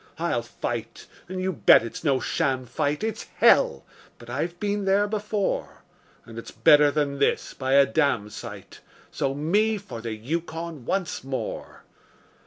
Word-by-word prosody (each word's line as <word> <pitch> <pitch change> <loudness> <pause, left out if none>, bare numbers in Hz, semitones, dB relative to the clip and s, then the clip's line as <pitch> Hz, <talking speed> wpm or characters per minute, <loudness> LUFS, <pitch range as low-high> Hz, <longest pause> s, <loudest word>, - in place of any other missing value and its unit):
I'll - - 0
fight - - -5 0.2
and 185 0 -4
you 185 0 -1
bet 150 - +6
it's 115 - -7
no 140 -4 +2
sham 130 -1 -1
fight; 145 - -2
It's 220 -1 -3
hell! 65 - +4 0.3
but 120 0 -11
I've 170 +7 -3
been 205 -1 -1
there 195 +1 +3
before; 210 -1 -2 0.4
And 115 0 -9
it's - - -9
better 145 +6 +5
than 145 -1 -1
this 140 - +1
by 130 0 -2
a 140 0 +7
damsite 125 -6 -2 0.3
So 135 0 -2
me 205 +9 +1
for 190 - -8
the 115 -1 -4
Yukon 160 +3 -5
once 190 -4 -2
more. 135 0 -5
150 Hz, 150 wpm, -25 LUFS, 130-190 Hz, 0.4 s, a